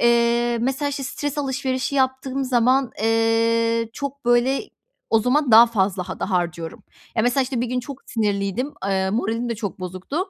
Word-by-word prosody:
eee, 235 0 +3
mesela, 270 +4 0
işte, 280 -1 -4
stres 290 +2 -4
alışverişi 265 -1 -2
yaptığım 265 0 0
zaman, 255 +1 +2
eee, 230 0 +2
çok, 280 -1 -6
böyle, 240 - +3 0.5
o 225 - +5
zaman 255 +4 +1
daha 230 +2 +9
fazla 190 -5 -1
hada - - -4
harcıyorum. 175 +3 -2 0.3
Ya, 220 - +3
mesela, 245 +3 +2
işte, 255 -2 -2
bir 245 - 0
gün 250 +1 -1
çok 275 +2 -8
sinirliydim. 210 +4 -1
Eee, 190 -1 0
moralim 230 +2 -1
de 235 - -1
çok 205 -4 -5
bozuktu. 185 - -6
235 Hz, 165 wpm, -22 LUFS, 225-265 Hz, 0.5 s, daha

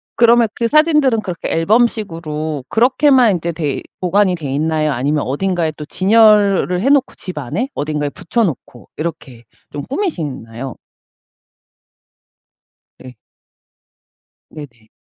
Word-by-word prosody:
그러면 235 0 +4
그 235 - -1
사진들은 300 -5 +3
그렇게 180 -5 -5
앨범식으로 165 - -1
그렇게만 255 0 +4
인제 170 -1 -3
돼 150 -4 -3 0.2
보관이 185 +1 +2
돼있나요? 155 0 -1
아니면 145 +3 -1
어딘가에 170 +3 -1
또 150 - -7
진열을 200 -1 +3
해놓고 270 +2 +2
집 185 -4 -8
안에 160 - -3
어딘가에 150 0 -2
붙여놓고 165 - -3
이렇게 135 -7 -6 0.3
좀 145 -1 -6
꾸미시나요? 140 - -4 2.2
네. 130 -1 -12 1.4
네네. 120 -8 -12
170 Hz, 265 characters per minute, -17 LUFS, 150-230 Hz, 2.2 s, 그러면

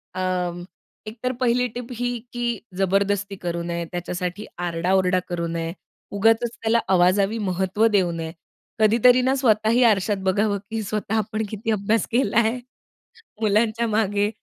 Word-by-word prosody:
अ, 180 -1 -2 0.4
एकतर 240 +4 -3
पहिली 250 0 +2
टिप 240 +1 -7
ही 245 0 -2 0.2
की 240 0 -3 0.3
जबरदस्ती 200 +1 +1
करू 170 -2 -4
नये. 170 0 -3
त्याच्यासाठी 180 +3 -4 0.2
आरडा-ओरडा 180 +2 +1
करू 170 -1 -2
नये. 165 0 -3 0.4
उगाचच 225 +3 +3
त्याला 230 +1 +2
आवाजावी 195 +4 +3
महत्व 190 +4 +1
देऊ 180 -3 +3
नये. 165 -1 -5 0.5
कधीतरी 235 +4 +5
ना 260 +2 +2
स्वतःही 230 -1 +3
आरशात 205 -2 +3
बघावं 200 +2 +1
की 225 0 -2
स्वतः 210 +1 -3
आपण 215 +1 -1
किती 220 +1 -3
अभ्यास 215 +2 +1
केलाय. 235 0 +2 0.8
मुलांच्या 220 +2 +2
मागे 205 -1 +1
205 Hz, 135 wpm, -23 LUFS, 185-225 Hz, 0.8 s, कधीतरी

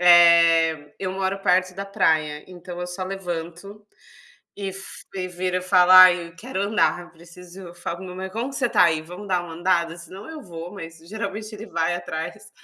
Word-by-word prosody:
Eh, 170 -3 +6
eu 185 -1 -3
moro 190 0 -2
perto 185 0 +2
da 195 +1 -5
praia, 155 -6 +1
então 180 0 -9
eu 180 - -3
só 185 +1 -5
levanto 185 +2 -6 0.7
e 200 -1 -4
f 195 0 -10
e 185 -1 -3
viro 180 +1 -2
e - - -3
falo 180 0 +4
ai, 180 -2 +8
quero 225 -2 -4
andar, 200 -3 +1
eu 175 - -13
preciso 175 +2 -14
eu 170 - -11
falo 175 0 -5
pro 190 - -9
meu 180 0 -8
marido 190 0 -6
como 240 +5 -3
você 265 -3 0
está 180 - +4
aí, 160 -2 +2
vamos 180 +5 -10
dar 180 -2 +1
uma 165 -2 -9
andada? 170 -1 0
Senão 185 - -11
eu 315 -2 -8
vou, 175 -2 -9
mas 165 -4 -9
geralmente 215 +4 -6
ele 215 +2 -8
vai 170 -2 -1
atrás, 160 -2 -6
180 Hz, 200 wpm, -23 LUFS, 170-195 Hz, 0.7 s, ai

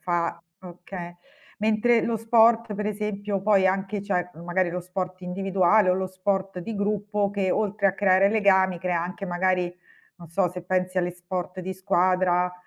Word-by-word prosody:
fa 170 -1 -1 0.2
okay. 175 -1 -9 0.4
Mentre 220 +2 +2
lo 230 - 0
sport, 225 0 +3
per 210 +1 -3
esempio 205 -1 -3
poi 195 -1 +3
anche 195 +2 -2
c'è 180 -3 -2
magari 180 +1 0
lo 180 - -3
sport 185 +1 -5
individuale 190 +2 +2
o - - +3
lo 190 0 -1
sport 190 0 -2
di 220 +6 -5
gruppo 205 0 -1
che, 200 -2 -1
oltre 210 -1 0
a 190 - +3
creare 195 0 +3
legami, 190 -4 +3
crea 180 -2 0
anche 180 +3 -5
magari, 180 0 0 0.4
non 175 -1 -12
so, 180 +2 +1
se 180 0 -7
pensi 185 +1 -1
agli 175 -1 0
sport 180 +1 -5
di 185 +1 -4
squadra, 185 -1 +1
190 Hz, 165 wpm, -25 LUFS, 180-205 Hz, 0.4 s, sport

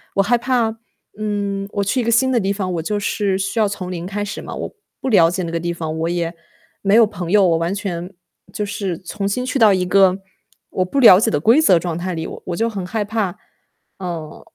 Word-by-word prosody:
我 195 - +4
害 240 +4 +3
怕， 235 -2 0 0.4
嗯， 200 -2 -2
我 200 - 0
去 250 +6 0
一 - - -2
个 235 - 0
新 260 +3 +3
的 245 - +2
地 195 0 0
方， 185 -3 -3
我 165 - -2
就 205 +5 -2
是 200 -2 0
需 195 +4 -3
要 210 - +4
从 185 -3 -5
零 175 -1 -5
开 205 +2 -3
始 205 - -6
嘛， - - -8
我 - - -6 0.3
不 - - -3
了 170 -7 +5
解 185 0 -2
那 165 - -4
个 170 - -1
地 170 +1 -2
方， 160 -1 -4
我 165 +1 -1
也 170 -1 -2 0.5
没 200 0 +1
有 230 -1 +7
朋 180 -4 -6
友。 200 -3 +5
我 165 -1 +3
完 170 +3 -1
全 190 -2 -4 0.4
就 210 - -2
是 200 -4 -4
重 195 +3 -5
新 250 +5 -1
去 265 +2 -1
到 215 -3 +6
一 180 -1 0
个 190 0 +4 0.5
我 185 - 0
不 275 +9 -1
了 205 -8 +9
解 - - +1
的 145 - +1
规 235 - +5
则 185 - +5
状 170 -1 -3
态 180 +1 -3
里， 160 0 -4
我 - - -9
我 175 - -2
就 230 +1 +1
很 195 -4 -5
害 210 +2 -2
怕。 205 -3 -2 0.6
嗯。 170 -4 -6
195 Hz, 265 characters per minute, -19 LUFS, 175-215 Hz, 0.6 s, 了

